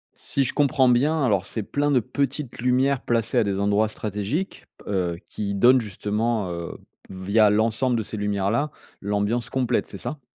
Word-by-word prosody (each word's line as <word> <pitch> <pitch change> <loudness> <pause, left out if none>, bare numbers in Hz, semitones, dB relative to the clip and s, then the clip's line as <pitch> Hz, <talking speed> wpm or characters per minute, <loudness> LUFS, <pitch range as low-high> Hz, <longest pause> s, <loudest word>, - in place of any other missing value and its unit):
Si 140 - 0
je 125 - -1
comprends 140 -3 +3
bien, 145 +5 +2
alors, 100 -6 +1
c'est 110 +1 -3
plein 145 +7 -1
de 135 -3 +4
petites 140 +2 -3
lumières 130 +2 +2
placées 115 -3 +1
à - - +4
des 100 -2 -1
endroits 105 +2 +2
stratégiques, 105 - -4 0.2
heu, 90 -4 -1
qui 100 -1 -4
donnent 125 +6 +5
justement, 105 0 -2
heu, 85 -1 -6 0.3
via 100 +3 +3
l'ensemble 115 +4 +1
de 110 - -1
ces 110 - -6
lumières-là, 105 +7 0 0.3
l'ambiance 105 +3 -1
complète, 125 -2 0
c'est - - -8
ça? 135 +5 -5
115 Hz, 170 wpm, -24 LUFS, 100-130 Hz, 0.3 s, donnent